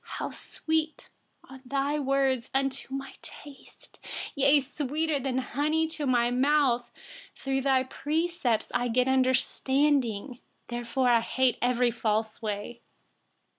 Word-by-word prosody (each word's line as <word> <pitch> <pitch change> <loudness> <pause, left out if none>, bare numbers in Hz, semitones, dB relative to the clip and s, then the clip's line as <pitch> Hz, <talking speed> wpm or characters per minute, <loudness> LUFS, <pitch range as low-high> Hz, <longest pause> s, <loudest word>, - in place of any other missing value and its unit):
103How - - -4
sweet 315 -1 -3 0.4
are 265 - -11
your 260 - -21
promises 275 -2 0 0.3
to 265 - -11
my 270 0 -6
taste, 285 -2 -14 0.8
more 300 +2 0
than 260 -1 -2
honey 300 +5 0
to 305 -3 -4
my 240 -1 +2
mouth! 260 -2 +2 0.5
104Through 270 -1 -1
your 260 0 +2
precepts, 300 -4 -1
I 245 - +1
get 250 +2 +2
understanding; 265 -2 +1 0.3
therefore 240 +1 0
I 235 -1 +5
hate 255 +1 +1
every 245 0 +2
false 220 -1 -1
way. 215 +2 -4
260 Hz, 115 wpm, -28 LUFS, 240-285 Hz, 0.8 s, I